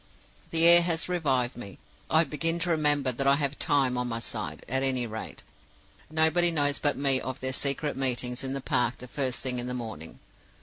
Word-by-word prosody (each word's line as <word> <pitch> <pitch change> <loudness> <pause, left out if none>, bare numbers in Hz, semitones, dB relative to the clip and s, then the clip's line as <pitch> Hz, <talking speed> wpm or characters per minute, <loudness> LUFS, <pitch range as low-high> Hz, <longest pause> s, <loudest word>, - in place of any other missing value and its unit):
"The 165 0 +3
air 170 0 +8
has 170 -1 -1
revived 135 -9 0
me. 100 -5 -9 0.3
I 160 +1 +4
begin 165 +2 0
to 175 - 0
remember 145 -4 +2
that 135 +3 -2
I 140 - +6
have 140 -1 -2
Time 135 -4 +1
on 125 - -2
my 115 -1 -3
side, 80 -7 -7
at 130 +2 +1
any 130 -2 0
rate. 110 -1 -8 0.7
Nobody 160 +2 +3
knows 145 -3 +2
but 145 -1 0
me 135 -1 +2
of 130 +1 -5
their 130 0 -2
secret 140 +2 0
meetings 125 -1 -1
in 135 0 -4
the 135 - -4
park 125 -2 -1
the 125 - -11
first 130 -2 -2
thing 125 -1 -3
in 120 - -5
the 125 - -4
morning. 110 -10 -7
135 Hz, 205 wpm, -27 LUFS, 125-150 Hz, 0.7 s, air